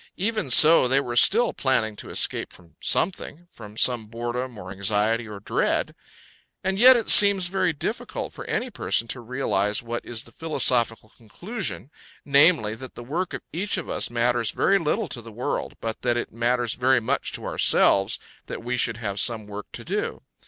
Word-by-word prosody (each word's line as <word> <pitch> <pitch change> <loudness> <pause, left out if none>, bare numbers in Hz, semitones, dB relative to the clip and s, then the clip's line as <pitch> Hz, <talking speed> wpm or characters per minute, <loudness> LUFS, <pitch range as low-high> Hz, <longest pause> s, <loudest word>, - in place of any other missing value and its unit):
Even 215 -4 -2
so 155 +2 +7
they 135 +2 +2
were 120 -4 -4
still 225 - +4
planning 110 -5 0
to - - -9
escape - - -1
from 85 -2 -17
something 175 -2 -2
from 105 -1 -13
some 120 -3 0
boredom 120 +2 -5
or 95 -2 -9
anxiety 105 +4 0
or 105 -2 -8
dread. 100 - -1 0.7
And 190 +1 -1
yet 255 +2 +8
it 230 - +1
seems 200 -3 +7
very 185 -1 +1
difficult 150 - -5
for - - -8
any - - -3
person 115 - -1
to 130 - -2
realise 115 -4 -1
what 120 0 -5
is 120 0 -4
the - - -17
philosophical 120 -8 0
conclusion, 165 - -5 0.3
namely, 140 -6 +4
that 130 +3 -10
the 120 - -9
work 170 +9 -3
of - - -8
each 195 +4 -1
of 180 - -6
us - - -1
matters 120 -1 0
very 195 0 +2
little 185 +6 -1
to 120 - -5
the 115 0 -12
world, 120 +4 -4
but 115 -1 -5
that 120 -1 0
it 120 - -4
matters 120 0 0
very 130 0 +2
much 115 - -2
to - - -5
ourselves 95 0 +3 0.3
that - - -7
we 125 +1 -2
should 120 -2 0
have 100 -3 -4
some 115 -2 0
work 105 0 -8
to - - -7
do. - - -3
120 Hz, 185 wpm, -24 LUFS, 110-160 Hz, 0.7 s, yet